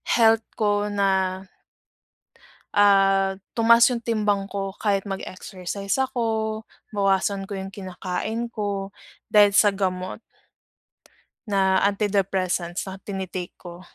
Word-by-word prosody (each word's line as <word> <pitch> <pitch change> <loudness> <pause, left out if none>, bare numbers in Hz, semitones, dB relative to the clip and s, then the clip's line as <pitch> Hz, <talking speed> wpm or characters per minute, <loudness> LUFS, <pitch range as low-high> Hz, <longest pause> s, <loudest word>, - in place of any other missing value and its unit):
health 225 -1 +4
ko 205 -1 +1
na 200 -1 +1 1.6
ah 195 -1 +4 0.2
tumaas 230 0 +5
yung 240 - -1
timbang 210 -4 0
ko 195 -1 -4
kahit 200 -2 +1
mag-exercise 195 0 -6
ako, 220 -4 -1 0.3
bawasan 195 0 +1
ko 195 0 -6
yung 190 - -5
kinakain 195 +4 -4
ko, 205 -3 -4 0.3
dahil 205 -1 +6
sa 205 0 +4
gamot 185 +1 -3 1.3
na 190 -1 +3
antidepressants 190 -4 -1
na 190 0 -8
tini-take 190 -2 -5
ko. 175 0 -11
200 Hz, 105 wpm, -24 LUFS, 190-210 Hz, 1.6 s, dahil